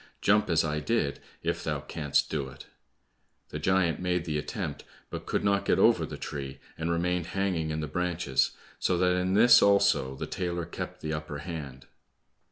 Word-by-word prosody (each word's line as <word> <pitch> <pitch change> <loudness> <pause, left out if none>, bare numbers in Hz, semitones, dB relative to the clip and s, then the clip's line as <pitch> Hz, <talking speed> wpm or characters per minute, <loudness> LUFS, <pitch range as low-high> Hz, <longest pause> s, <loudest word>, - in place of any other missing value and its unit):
Jump 105 0 +3
as 80 -1 +3
I 75 -1 -1
did, 75 -4 0 0.2
if - - -1
thou - - -1
canst 75 -3 0
do 70 -4 -2
it." 65 - -12 0.8
The 75 - -5
giant 90 -1 +2
made 90 -2 0
the 75 -2 -1
attempt, - - -4 0.3
but - - -6
could - - 0
not 100 -1 +2
get - - +2
over - - +4
the - - -7
tree, 70 -1 -6 0.2
and 80 +1 -3
remained 85 0 0
hanging 90 -5 0
in 80 0 -2
the 75 - -3
branches, 90 -3 0 0.3
so 90 - +1
that 90 0 +3
in 90 +1 0
this 120 +3 +8
also 100 -9 +3
the - - -4
tailor 85 -2 -3
kept 85 - -7
the 80 0 -3
upper 75 -1 -4
hand. 75 -5 -7
85 Hz, 180 wpm, -28 LUFS, 75-90 Hz, 0.8 s, this